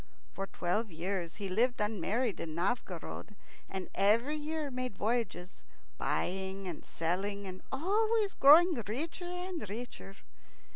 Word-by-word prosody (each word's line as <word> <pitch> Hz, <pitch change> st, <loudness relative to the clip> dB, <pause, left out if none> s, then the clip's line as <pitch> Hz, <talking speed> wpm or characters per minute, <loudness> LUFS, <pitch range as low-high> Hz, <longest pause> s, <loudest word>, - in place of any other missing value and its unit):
For 195 Hz, 0 st, -3 dB
twelve 200 Hz, +6 st, -1 dB
years 175 Hz, +1 st, -3 dB
he 205 Hz, -2 st, -4 dB
lived 240 Hz, +7 st, +2 dB
unmarried 210 Hz, +2 st, 0 dB
in 155 Hz, -1 st, -4 dB
Novgorod, 190 Hz, 0 st, -2 dB, 0.3 s
and 190 Hz, -1 st, -4 dB
every 230 Hz, +9 st, +3 dB
year 305 Hz, -1 st, -3 dB
made 255 Hz, -5 st, -3 dB
voyages, 215 Hz, -5 st, -1 dB, 0.4 s
buying 190 Hz, +1 st, -1 dB
and 170 Hz, -4 st, -5 dB
selling, 195 Hz, +5 st, -2 dB
and 185 Hz, -1 st, -7 dB
always 415 Hz, +7 st, +2 dB
growing 330 Hz, +6 st, +8 dB
richer 315 Hz, -, -2 dB
and 360 Hz, -, -4 dB
richer. 215 Hz, -3 st, -6 dB
210 Hz, 125 wpm, -33 LUFS, 190-280 Hz, 0.4 s, growing